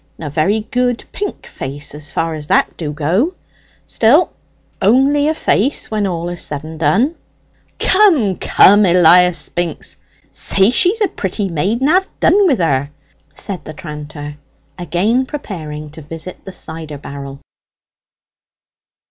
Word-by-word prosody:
A 150 -3 -5
very 190 +9 +1
good 245 +2 -1
pink 410 -1 -5
face, 140 +2 -6
as 150 0 -8
far 165 +4 -2
as 150 -1 -6
that - - +2
do 155 -3 -4
go. 180 - 0 0.5
Still, 275 +11 +3 0.5
only 270 +7 +3
a 315 - +1
face, 270 -3 0
when 210 -2 0
all 170 -2 -3
is 175 -1 -6
said 145 -1 -3
and 160 0 -9
done." 220 - +2 0.6
"Come, 325 - +3
come, 205 +2 +5
Elias 180 0 +5
Spinks, 170 +2 -3 0.3
say 195 +3 +3
she's 375 - +2
a 415 - +4
pretty 195 - -3
maid, 190 - -1
and 275 - +2
have 380 +2 +3
done 400 0 +4
wi' 285 - +3
her," 145 - 0 0.5
said 195 -3 -6
the 155 - -8
tranter, 150 -1 -8 0.4
again 185 - 0
preparing 155 - -7
to 160 - -10
visit 165 +4 -8
the 190 - -7
cider 160 -4 -8
barrel. 140 -1 -8
180 Hz, 140 wpm, -16 LUFS, 155-245 Hz, 0.6 s, come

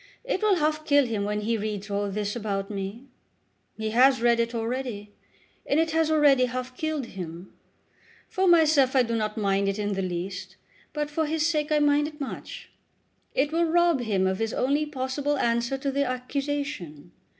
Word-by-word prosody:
It - - -2
will 425 -2 +4
half 310 -2 0
kill 285 -3 +4
him 215 -4 -2
when 210 0 -2
he 225 +1 -1
reads 210 -1 -4
all 200 0 -1
this 205 +1 -3
about 200 -3 -3
me. 200 +5 -5 0.7
He 220 0 -3
has 260 +3 +5
read 235 0 +3
it 235 0 0
already, 230 -3 -3 0.5
and 285 - +1
it 325 0 +1
has 320 -1 +2
already 290 -5 +5
half 255 +1 -5
killed 310 -2 -2
him. 180 -3 -8 0.7
For 380 0 0
myself 310 -6 +5
I 260 - +5
do 230 -1 -2
not 215 -1 -2
mind 200 -1 +1
it 195 - -2
in 205 -1 -1
the 195 - -2
least, 185 +1 -5 0.4
but 300 -1 -3
for 315 +1 0
his 310 0 0
sake 305 -2 0
I 305 - +4
mind 295 0 +3
it 300 -1 -11
much. 275 - -7 0.6
It 285 +2 +1
will 335 +1 +2
rob 340 -2 +3
him 205 -6 0
of 190 0 0
his 225 0 -2
only 285 +4 +1
possible 285 +1 -2
answer 235 +2 0
to 275 +1 -2
the 280 +1 +1
accusation. 255 - -4
255 Hz, 185 wpm, -26 LUFS, 210-295 Hz, 0.7 s, has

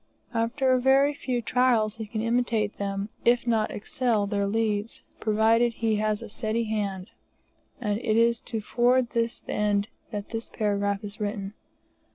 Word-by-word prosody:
After 250 +3 +2
very 270 +3 +4
few 250 -4 -2
trials 230 -3 +2
he 220 -1 -5
can 215 +1 -3
imitate 230 -2 0
them, 200 0 -2 0.2
if 240 0 +3
not 225 -3 +1
excel 220 -1 0
their 200 -1 0
Leeds, 215 0 -1 0.2
provided 225 +2 +3
he 225 -1 0
has 215 0 0
a - - -7
steady 220 +1 -1
hand. 205 -3 -3 0.7
And 210 -3 -1
it 225 -3 +1
is 235 0 +3
to 225 -2 -3
forward 245 +2 +2
this 230 0 -1
end 205 0 0 0.2
that 205 -1 -5
this 225 0 -5
paragraph 205 -1 -1
is 205 +2 -8
written. 205 -1 -3
220 Hz, 155 wpm, -26 LUFS, 205-235 Hz, 0.7 s, very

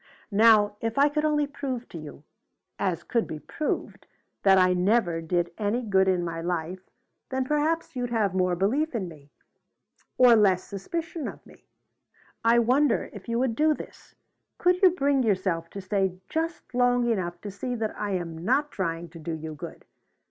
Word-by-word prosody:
Now 210 -1 +5
if 225 +1 -2
I 285 +1 +5
could 300 +1 -1
only 300 -1 +2
prove 270 -4 -5
to - - -8
you, 150 -1 -10 0.6
as 180 -4 -1
could 230 -2 0
be 155 - -5
proved, 300 - -4 0.3
that 195 -1 +5
I 185 -1 +5
never 180 -2 +2
did 175 +1 -1
any 220 +4 0
good 190 -3 +3
in 180 -2 +1
my 165 -1 -4
life, 175 +1 -3 0.5
then 260 0 -1
perhaps 300 +2 0
you'd 245 -1 -2
have 215 -5 +1
more 185 -1 +1
belief 250 - 0
in 195 -5 -2
me, 150 -4 -13 0.9
or 250 -2 +7
less 195 -4 +3
suspicion 325 - -5
of - - -9
me. - - -19 0.8
I 230 +1 +5
wonder 250 +3 +2
if 205 +2 -10
you 230 - 0
would 245 -2 0
do 305 +2 +3
this? - - -12 0.4
Could 360 0 +2
you 375 - +8
bring 285 -6 +1
yourself 185 -7 0
to 200 - -7
stay 190 -1 -1
just 325 -5 -3
long 245 -1 +3
enough 180 -6 -1
to 205 - -6
see 245 +6 -4
that 220 -2 -3
I 205 -1 -3
am 165 -3 -4
not 280 +8 +1
trying 170 -2 -3
to 165 +1 -12
do 160 +1 -4
you 160 0 -6
good? 150 - -9
210 Hz, 180 wpm, -26 LUFS, 180-255 Hz, 0.9 s, you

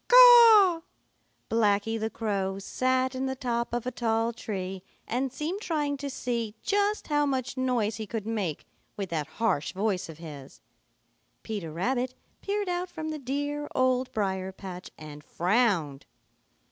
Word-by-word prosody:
Blacky 225 0 +1
the 220 +1 -1
Crow 195 -4 -2
sat 255 +5 0
in 260 +1 -2
the 265 - -2
top 240 -2 -2
of 240 0 -2
a 255 - -2
tall 230 -1 0
tree 190 -4 -5 0.3
and 255 +3 -1
seemed 330 - -4
trying 295 -6 -1
to 280 0 -4
see 235 -4 -3
just 410 +1 +1
how 295 0 +3
much 260 -2 -2
noise 245 -5 0
he 220 -1 -5
could 220 -1 -4
make 205 -9 -3 0.3
with 195 -3 -4
that 155 -3 -1
harsh 205 -11 0
voice 195 -3 -1
of 160 - -9
his. 145 -5 -10 0.8
Peter 200 -8 -4
Rabbit 250 +9 -1 0.3
peered 405 0 -2
out 355 0 -2
from 315 -3 -5
the 310 -1 -4
dear 290 +2 -3
Old 255 0 +2
Briar 190 -3 -1
patch 185 -1 -8
and 150 -1 -10
frowned. 175 - +1
230 Hz, 145 wpm, -28 LUFS, 195-260 Hz, 0.8 s, how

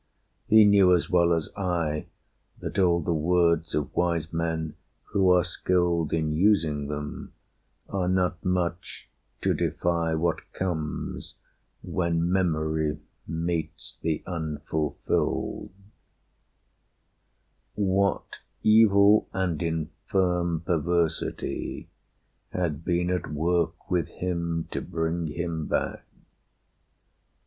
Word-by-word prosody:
He 110 -1 +7
knew 100 -3 +6
as 85 - -1
well 85 -1 +4
as 80 -2 0
I 85 -5 -1 0.5
That - - -4
all 85 -2 +3
the 85 +2 0
words 85 0 +2
of 75 -1 -2
wise 85 -2 0
men 80 -1 -2 0.3
who 95 -2 +2
are 90 -1 +5
skilled 85 -4 +1
In 80 -2 0
using 80 -5 +2
them 75 0 -6 0.5
are 95 -3 -1
not 90 -1 0
much 90 -1 -2 0.4
to - - +3
defy 85 -2 0
What 85 +1 0
comes 80 -5 -4 0.5
when 85 -1 0
memory 80 -4 0 0.3
meets 80 -1 -4
the 80 -1 -1
unfulfilled. 80 -3 -2 2.1
What 100 -1 0 0.2
evil 105 -1 +6
and 95 -5 -1
infirm 85 +1 -1
perversity 85 0 -1 0.6
Had 80 -4 -2
been 90 +1 0
at 90 -3 -2
work 85 +4 -1
with 85 -4 +1
him 85 -2 -3
to - - -2
bring 80 0 -2
him 80 0 -3
back? - - -1
85 Hz, 100 wpm, -26 LUFS, 80-90 Hz, 2.1 s, He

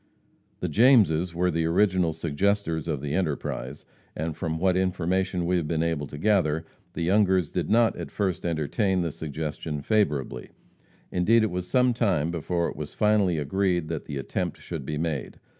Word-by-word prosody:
The - - 0
Jameses 95 - +4
were 90 +1 +1
the 80 0 0
original 90 -1 +2
suggestors 80 +1 -1
of 75 -5 -2
the 70 0 -3
enterprise, 75 -5 -3 0.3
and 80 0 -3
from 80 -1 -3
what 90 +2 +2
information 95 0 0
we 90 +1 +2
have 80 -3 -1
been 80 0 0
able 80 -3 -1
to 75 - -9
gather, 80 -4 +1 0.3
the 85 - -3
Youngers 95 -2 +2
did 85 -4 -2
not 115 +1 +4
at - - -6
first 95 -3 -2
entertain 85 - 0
the 85 -2 -1
suggestion 75 0 -5
favorably; 75 - 0 0.6
indeed, 110 +6 +3
it 110 - 0
was 90 0 -3
some 125 +3 +3
time 90 -9 +1
before 85 +1 -1
it - - -6
was 75 -1 -7
finally 105 -5 +3
agreed 85 +2 0
that 80 -3 -4
the 70 - -5
attempt 70 - -3
should - - -7
be 75 - -2
made. 75 -4 -3
85 Hz, 175 wpm, -26 LUFS, 80-95 Hz, 0.6 s, Jameses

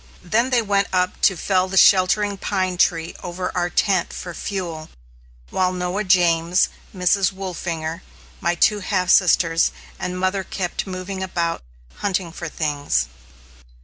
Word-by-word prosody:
Then 230 +8 +1
they 245 -3 +2
went 200 -1 +1
up 180 0 0
to 190 - +4
fell 185 +1 +1
the 190 +1 -3
sheltering 200 +2 +5
pine 190 -2 -2
tree 165 -2 +1
over 180 +1 -4
our 175 -1 0
tent 190 -1 +1
for 175 - -6
fuel; 170 -4 -5 0.6
while 185 -1 +1
Noah 180 +3 -2
James, 175 -2 +3 0.2
Mrs. 185 0 +2
Wolfinger, 170 -3 -4 0.4
my 170 0 0
two 210 +4 +3
half 185 -2 0
sisters, 170 -2 +4 0.3
and 180 0 -3
mother 190 +1 0
kept 185 0 -4
moving 190 +1 -5
about 170 -3 -2 0.4
hunting 190 -4 -2
for 170 0 -6
things. 145 - -1
185 Hz, 140 wpm, -21 LUFS, 170-195 Hz, 0.6 s, sheltering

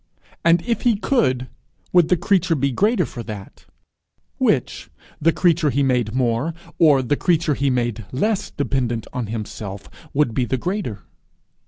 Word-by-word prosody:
And 170 0 +4
if 235 -1 -1
he 240 -3 +3
could, 200 - +1 0.5
would 175 -3 +5
the 180 - +4
creature 180 -2 +2
be 140 -1 +1
the - - -4
greater 220 +4 +2
for 120 - -7
that? 105 -4 -9 0.7
Which, - - 0 0.3
the 165 +2 +4
creature 170 -3 +2
he 140 +1 +1
made 125 -4 +1
more, 130 +5 0 0.2
or 145 -5 +5
the 135 +4 +1
creature 165 -1 +1
he 140 0 0
made 120 -4 -1
less 205 +10 0
dependent 125 -5 -2
on 125 -3 -3
himself, 105 -2 -6 0.2
would 140 -5 +1
be 125 +2 +1
the 130 - -1
greater? 150 - -3
140 Hz, 160 wpm, -21 LUFS, 120-170 Hz, 0.7 s, would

